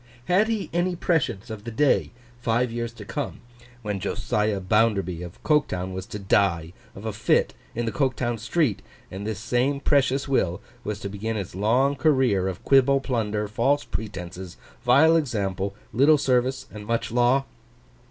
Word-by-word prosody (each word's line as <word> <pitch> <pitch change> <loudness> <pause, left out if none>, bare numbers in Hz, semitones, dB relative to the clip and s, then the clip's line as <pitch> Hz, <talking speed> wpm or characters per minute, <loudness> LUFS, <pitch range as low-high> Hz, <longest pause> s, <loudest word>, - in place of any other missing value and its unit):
Had 190 +7 +3
he 215 -6 -1
any 175 +1 +1
prescience 150 - -1
of 105 -2 -7
the 115 - -5
day, 135 +6 +2 0.3
five 120 0 +1
years 115 0 -3
to 110 -3 -10
come, 145 +6 -4 0.4
when 105 -2 -2
Josiah 105 +2 -1
Bounderby 95 -3 +1
of 90 -1 -8
Coketown 95 - +1
was 95 0 -5
to - - -6
die 95 -5 +1 0.2
of 95 - -9
a 110 - -2
fit 110 +3 +2 0.2
in 120 +1 -1
the 115 - -1
Coketown 130 -4 -1
street, 115 - 0 0.3
and 100 +3 -5
this 110 -3 -2
same 125 +6 0
precious 140 -1 +2
will 95 -9 +1 0.2
was 105 -1 -4
to - - -3
begin 105 +3 -3
its 100 -4 -5
long 120 +9 +2
career 130 - +2
of 95 -1 -5
quibble, 135 0 +5
plunder, 110 -5 -1
false 140 +7 +1
pretences, 90 -2 -6 0.3
vile 160 +6 +6
example, 100 - -1 0.2
little 145 +5 +5
service 130 -1 +1
and 105 -1 -9
much 115 -1 -1
law? 125 +3 +3
115 Hz, 160 wpm, -25 LUFS, 100-135 Hz, 0.4 s, vile